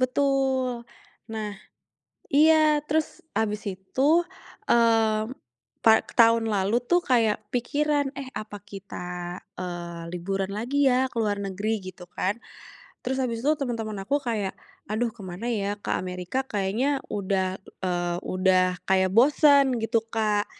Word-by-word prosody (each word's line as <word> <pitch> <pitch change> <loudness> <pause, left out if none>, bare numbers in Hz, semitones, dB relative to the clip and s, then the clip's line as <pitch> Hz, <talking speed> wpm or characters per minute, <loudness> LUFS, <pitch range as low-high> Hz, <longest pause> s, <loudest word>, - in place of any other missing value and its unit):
Betul, 260 -2 +1 0.4
nah, 215 -2 -4 0.8
iya, 310 0 +5
terus 310 +1 -1 0.2
abis 210 -1 0
itu, 265 - +1 0.4
eee, 225 -2 +3 0.6
tah 220 0 +7 0.2
tahun 230 -1 +6
lalu 205 +1 +1
tuh 350 +7 +3
kayak 230 -7 +2
pikiran, 285 +3 +1
"Eh, 270 -2 -5
apa 215 -1 -5
kita, 180 -3 -7 0.2
eee, 175 -1 -5
liburan 190 +2 -2
lagi 265 +7 +1
ya, 260 +1 +2
ke - - -18
luar 210 -2 +1
negeri", 200 +3 -2
gitu 180 - -12
kan, 190 +3 -1 0.7
terus 260 +1 -1
abis 230 -2 -2
itu 300 - +4
teman-teman 225 -5 -3
aku 280 +9 +1
kayak, 215 -6 -2 0.4
"Aduh, 230 +2 0
ke 235 - -18
mana 185 +5 -7
ya, 205 -2 -1
ke - - -5
Amerika 180 +7 -3
kayaknya 225 +7 0
udah, 190 -1 -1 0.3
eee, 175 -1 -1
udah 185 -1 +2
kayak 190 0 +3
bosen", 275 +2 +5
gitu, 225 0 +2
Kak. 215 -2 +1
220 Hz, 130 wpm, -26 LUFS, 190-260 Hz, 0.8 s, tah